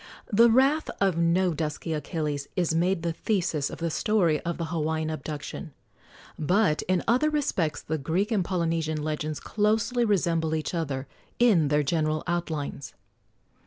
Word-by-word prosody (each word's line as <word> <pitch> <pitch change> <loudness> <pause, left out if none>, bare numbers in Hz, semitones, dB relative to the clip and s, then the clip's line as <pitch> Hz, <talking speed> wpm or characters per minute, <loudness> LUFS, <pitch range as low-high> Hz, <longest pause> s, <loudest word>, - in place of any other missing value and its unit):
The 230 +3 +7
wrath 270 +6 +3
of 195 -3 +2
no 170 +1 +2
dusky 155 +1 -3
Achilles 150 -2 -3
is 175 -3 +1
made 175 +1 +1
the 170 -1 -1
thesis 165 -7 -1
of - - -7
the 165 -1 -2
story 175 -6 +2
of 170 0 -3
the 170 - -2
Hawaiian 160 0 -1
abduction, 155 +2 -6 0.7
but 175 +1 +2
in 185 -1 +1
other 255 +7 +3
respects 190 - -1
the 155 0 -2
Greek 175 - -1
and 205 -5 +2
Polynesian 165 -4 -1
legends 155 0 -3
closely 220 +3 +1
resemble 170 -7 +1
each 155 +1 -3
other 140 -5 -2 0.3
in 205 -11 +4
their 150 +1 +2
general 155 +1 0
outlines. 160 -5 -3
165 Hz, 150 wpm, -27 LUFS, 155-195 Hz, 0.7 s, The